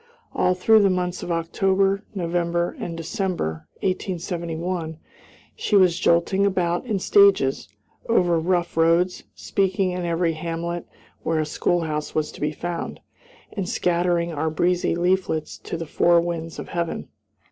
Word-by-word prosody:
All 180 Hz, -, +2 dB
through 220 Hz, +4 st, +5 dB
the 200 Hz, -, +4 dB
months 180 Hz, -1 st, -1 dB
of 175 Hz, -, -4 dB
October, 195 Hz, +4 st, +1 dB
November, 170 Hz, -1 st, -1 dB
and 170 Hz, -1 st, -5 dB
December, 165 Hz, -, -3 dB, 0.2 s
1871, 170 Hz, -3 st, -3 dB, 0.6 s
she 210 Hz, -, 0 dB
was 185 Hz, -4 st, +5 dB
jolting 170 Hz, +3 st, +3 dB
about 180 Hz, 0 st, 0 dB
in 215 Hz, -4 st, 0 dB
stages, 190 Hz, -, +4 dB, 0.4 s
over 175 Hz, -7 st, +3 dB
rough 175 Hz, +1 st, 0 dB
roads, 165 Hz, +2 st, +2 dB
speaking 190 Hz, -1 st, 0 dB
in 180 Hz, 0 st, -3 dB
every 170 Hz, 0 st, +1 dB
hamlet 170 Hz, +1 st, -4 dB, 0.3 s
where 165 Hz, -, 0 dB
a 155 Hz, -, +1 dB
schoolhouse 155 Hz, -1 st, -1 dB
was 155 Hz, -1 st, 0 dB
to -, -, -13 dB
be 150 Hz, 0 st, 0 dB
found, 170 Hz, +2 st, -5 dB, 0.5 s
and 195 Hz, -4 st, -3 dB
scattering 175 Hz, -1 st, +1 dB
our 160 Hz, +1 st, -1 dB
breezy 175 Hz, +2 st, +1 dB
leaflets 175 Hz, -3 st, 0 dB
to 170 Hz, -, -5 dB
the 165 Hz, -, -5 dB
four 170 Hz, +2 st, +4 dB
winds 165 Hz, -1 st, -3 dB
of -, -, -7 dB
heaven. 170 Hz, -1 st, -3 dB
175 Hz, 140 wpm, -23 LUFS, 165-185 Hz, 0.6 s, through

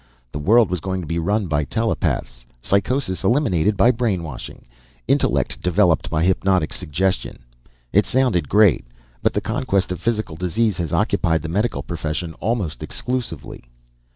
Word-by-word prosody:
The 70 Hz, -, -5 dB
world 110 Hz, +6 st, +4 dB
was 90 Hz, -, 0 dB
going 95 Hz, +2 st, -3 dB
to -, -, -6 dB
be 85 Hz, +2 st, -2 dB
run 100 Hz, +5 st, 0 dB
by 75 Hz, -3 st, 0 dB
telepaths, 70 Hz, -, -2 dB
psychosis 100 Hz, -, 0 dB
eliminated 105 Hz, -, +2 dB
by 115 Hz, +7 st, +5 dB
brainwashing, 95 Hz, -, -4 dB, 0.4 s
intellect -, -, +1 dB
developed 90 Hz, -2 st, +2 dB
by 80 Hz, 0 st, 0 dB
hypnotic 95 Hz, -2 st, +1 dB
suggestion. 90 Hz, +3 st, -1 dB, 0.6 s
It 105 Hz, +2 st, +4 dB
sounded 120 Hz, -, +1 dB
great 105 Hz, -8 st, +4 dB, 0.4 s
but -, -, +1 dB
the -, -, 0 dB
conquest 95 Hz, -2 st, -1 dB
of 90 Hz, -2 st, -4 dB
physical 110 Hz, -7 st, -1 dB
disease 95 Hz, +4 st, 0 dB
has 85 Hz, -3 st, -3 dB
occupied 80 Hz, -2 st, +1 dB
the 80 Hz, -, -4 dB
medical 105 Hz, +7 st, -1 dB
profession 80 Hz, 0 st, -4 dB
almost 100 Hz, -, -2 dB
exclusively. 125 Hz, -, -4 dB
95 Hz, 145 wpm, -21 LUFS, 80-110 Hz, 0.6 s, by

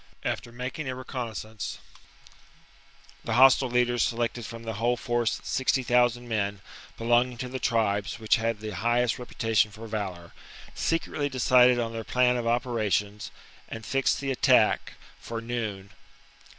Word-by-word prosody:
After 120 Hz, -, -3 dB
making 125 Hz, +4 st, -5 dB
a 130 Hz, -, -3 dB
reconnaissance, 115 Hz, -5 st, -5 dB, 1.5 s
the 115 Hz, -, -2 dB
hostile 130 Hz, 0 st, +6 dB
leaders 120 Hz, 0 st, +2 dB
selected 120 Hz, -1 st, -1 dB
from 115 Hz, 0 st, -9 dB
the 115 Hz, -1 st, -4 dB
whole 120 Hz, +1 st, +2 dB
force 120 Hz, -1 st, -1 dB
sixty 130 Hz, 0 st, 0 dB
thousand 120 Hz, 0 st, +2 dB
men 100 Hz, -3 st, -1 dB, 0.4 s
belonging 120 Hz, +1 st, +2 dB
to 125 Hz, -, -4 dB
the 130 Hz, +1 st, -5 dB
tribes 105 Hz, -4 st, 0 dB
which 110 Hz, +2 st, +3 dB
had 115 Hz, -1 st, -2 dB
the 110 Hz, -1 st, -5 dB
highest 120 Hz, +5 st, +1 dB
reputation 115 Hz, -3 st, +1 dB
for 110 Hz, +2 st, -10 dB
valour, 95 Hz, -6 st, -5 dB, 0.4 s
secretly 155 Hz, -3 st, -1 dB
decided 125 Hz, -1 st, +5 dB
on 115 Hz, -1 st, -2 dB
their 115 Hz, 0 st, -4 dB
plan 125 Hz, +2 st, +2 dB
of 120 Hz, -1 st, -2 dB
operations, 110 Hz, -4 st, 0 dB, 0.4 s
and 110 Hz, -1 st, -7 dB
fixed 135 Hz, 0 st, +1 dB
the 135 Hz, -1 st, -2 dB
attack 130 Hz, -, +3 dB, 0.3 s
for 115 Hz, 0 st, -5 dB
noon. 110 Hz, -5 st, -4 dB
120 Hz, 140 wpm, -27 LUFS, 110-125 Hz, 1.5 s, hostile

